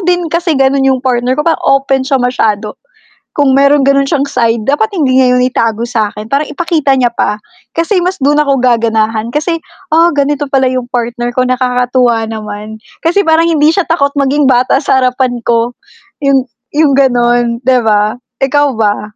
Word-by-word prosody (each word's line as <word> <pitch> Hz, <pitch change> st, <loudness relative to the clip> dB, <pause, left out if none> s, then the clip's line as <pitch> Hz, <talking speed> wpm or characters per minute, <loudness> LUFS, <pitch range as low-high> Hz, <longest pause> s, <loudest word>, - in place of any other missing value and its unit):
din 355 Hz, -1 st, +1 dB
kasi 335 Hz, -3 st, 0 dB
ganun 270 Hz, 0 st, +2 dB
yung 265 Hz, -1 st, +2 dB
partner 250 Hz, 0 st, 0 dB
ko, 300 Hz, -, 0 dB
parang 330 Hz, -, +1 dB
open 275 Hz, 0 st, +2 dB
siya 275 Hz, -, +2 dB
masyado 220 Hz, -4 st, -1 dB, 0.6 s
kung 275 Hz, -2 st, +2 dB
meron 280 Hz, +1 st, +4 dB
gano'n 275 Hz, 0 st, +3 dB
s'yang 280 Hz, 0 st, -1 dB
side 230 Hz, -2 st, 0 dB
dapat 415 Hz, +10 st, +1 dB
hindi 285 Hz, -9 st, 0 dB
nga 260 Hz, -1 st, +4 dB
itago 230 Hz, -2 st, -1 dB
sakin, 215 Hz, -1 st, -3 dB
parang 280 Hz, +4 st, -1 dB
ipakita 310 Hz, -3 st, -1 dB
niya 245 Hz, -, +3 dB
pa 210 Hz, +1 st, -1 dB, 0.3 s
kasi 350 Hz, +2 st, 0 dB
mas 370 Hz, +1 st, -2 dB
dun 290 Hz, +2 st, +2 dB
ako 275 Hz, -3 st, +1 dB
gaganahan 225 Hz, -2 st, 0 dB
kasi, 320 Hz, +4 st, -1 dB, 0.3 s
"Ah 335 Hz, +2 st, +3 dB
ganito 285 Hz, -1 st, -1 dB
pala 265 Hz, -1 st, +2 dB
yung 255 Hz, -1 st, -2 dB
partner 240 Hz, 0 st, -3 dB
ko 255 Hz, +1 st, 0 dB
nakakatuwa 250 Hz, -2 st, 0 dB
naman. 215 Hz, -1 st, -7 dB, 0.3 s
Kasi 350 Hz, +5 st, +2 dB
parang 325 Hz, +1 st, +2 dB
hindi 310 Hz, -2 st, +3 dB
siya 355 Hz, +1 st, -1 dB
takot 280 Hz, -4 st, +1 dB
maging 280 Hz, +1 st, +1 dB
bata 250 Hz, 0 st, +2 dB
sa 265 Hz, -, +2 dB
harapan 255 Hz, -1 st, 0 dB
ko" 235 Hz, 0 st, +1 dB, 0.5 s
yung 275 Hz, -3 st, +2 dB, 0.3 s
yung 300 Hz, -2 st, +3 dB
gano'n, 240 Hz, -2 st, +1 dB
'di 255 Hz, 0 st, +3 dB
ba? 210 Hz, +2 st, +1 dB, 0.2 s
Ikaw 290 Hz, +2 st, +2 dB
ba, 210 Hz, -1 st, -2 dB
260 Hz, 170 wpm, -11 LUFS, 240-290 Hz, 0.6 s, meron